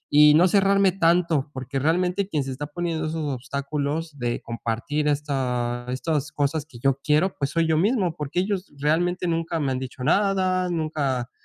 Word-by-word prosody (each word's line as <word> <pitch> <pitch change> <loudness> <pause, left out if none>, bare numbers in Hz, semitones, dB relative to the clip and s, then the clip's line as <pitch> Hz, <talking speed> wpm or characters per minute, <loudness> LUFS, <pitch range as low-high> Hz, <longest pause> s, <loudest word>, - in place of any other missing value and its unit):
Y 150 0 +8
no 175 +3 +6
cerrarme 195 0 +4
tanto, 165 -5 +2
porque 130 +1 -3
realmente 180 +6 +1
quien 150 -7 0
se 135 - -5
está 145 +3 -5
poniendo 160 0 -3
esos 160 0 -3
obstáculos 145 +4 -3
de 120 -1 -2
compartir 115 +6 -2
estas 125 -4 -1
estas 150 +3 -2
cosas 145 +1 -1
que 125 - -13
yo 135 +2 +1
quiero. 155 +5 +2
Pues 140 -1 -1
soy 165 -1 +1
yo 160 -1 +2
mismo, 195 -1 +1
porque 150 +1 -3
ellos 195 0 -3
realmente 170 +5 0
nunca 165 0 -1
me 140 -3 0
han 130 - -1
dicho 130 -1 -7
nada. 185 +2 +2
Nunca 150 -7 -1
155 Hz, 175 wpm, -24 LUFS, 135-175 Hz, -, Y